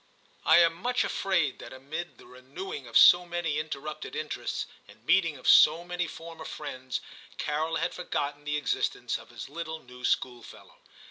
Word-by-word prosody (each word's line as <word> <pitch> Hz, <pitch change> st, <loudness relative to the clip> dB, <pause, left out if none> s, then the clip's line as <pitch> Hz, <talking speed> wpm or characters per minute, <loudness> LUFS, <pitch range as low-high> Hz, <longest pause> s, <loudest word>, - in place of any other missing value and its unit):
I -, -, +8 dB
am 170 Hz, -1 st, +6 dB
much 245 Hz, +9 st, 0 dB
afraid 175 Hz, -8 st, 0 dB
that -, -, -10 dB
amid 145 Hz, +6 st, -7 dB
the -, -, -16 dB
renewing 135 Hz, +3 st, -8 dB
of 115 Hz, -, +2 dB
so 175 Hz, 0 st, +9 dB
many 170 Hz, -3 st, -2 dB
interrupted 155 Hz, -, -6 dB
interests, 460 Hz, -, -3 dB, 0.2 s
and -, -, -18 dB
meeting 165 Hz, -6 st, +3 dB
of 130 Hz, -, -8 dB
so 160 Hz, +3 st, +7 dB
many 175 Hz, 0 st, -3 dB
former 165 Hz, 0 st, -9 dB
friends, 130 Hz, -4 st, -5 dB, 0.4 s
Carol 155 Hz, +2 st, -1 dB
had 165 Hz, +1 st, -1 dB
forgotten 145 Hz, -5 st, -3 dB
the 150 Hz, 0 st, -1 dB
existence 150 Hz, -, -1 dB
of -, -, -15 dB
his -, -, -8 dB
little 160 Hz, +2 st, -5 dB
new 125 Hz, 0 st, -14 dB
schoolfellow. 120 Hz, -1 st, -3 dB
155 Hz, 160 wpm, -28 LUFS, 140-175 Hz, 0.4 s, so